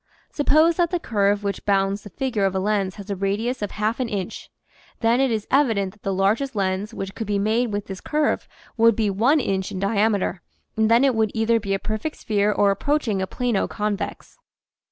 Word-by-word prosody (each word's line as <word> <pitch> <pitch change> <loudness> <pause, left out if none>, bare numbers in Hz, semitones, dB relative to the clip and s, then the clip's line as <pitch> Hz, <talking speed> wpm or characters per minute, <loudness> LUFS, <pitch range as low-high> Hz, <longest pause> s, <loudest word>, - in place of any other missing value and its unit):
Suppose 310 +3 +3
that 345 -2 +2
the 355 0 -1
curve 205 -6 +1
which 200 -1 -3
bounds 195 0 +1
the 205 - -11
figure 230 -1 -1
of 190 -1 0
a - - +1
lens 195 -1 0
has 200 -1 -8
a - - -1
radius 205 +6 -1
of 205 - -2
half 215 +3 -2
an 250 -3 -1
inch; 195 -3 -5 0.5
then 235 +2 +3
it 270 - +3
is 220 -3 -1
evident 225 -9 +2
that 210 - -25
the 195 - -2
largest 215 +8 +1
lens 195 +1 -1
which 195 -3 -6
could 225 - -5
be 205 -1 0
made 220 +3 +1
with 205 0 -3
this 190 -1 -7
curve 300 0 0 0.3
would 230 -1 +5
be 215 -2 +1
one 245 +11 +3
inch 190 -7 -1
in - - -5
diameter 200 -1 0 0.3
and 220 -1 +2
then 235 +3 +5
it 270 -2 +4
would 220 -1 +1
either 225 +1 +2
be 200 -2 -1
a - - 0
perfect 220 +10 -4
sphere 210 -1 0
or 200 0 +3
approaching 225 -2 0
a 190 - -2
plano 240 -3 -1
convex. 210 - -4
210 Hz, 215 wpm, -23 LUFS, 200-235 Hz, 0.5 s, would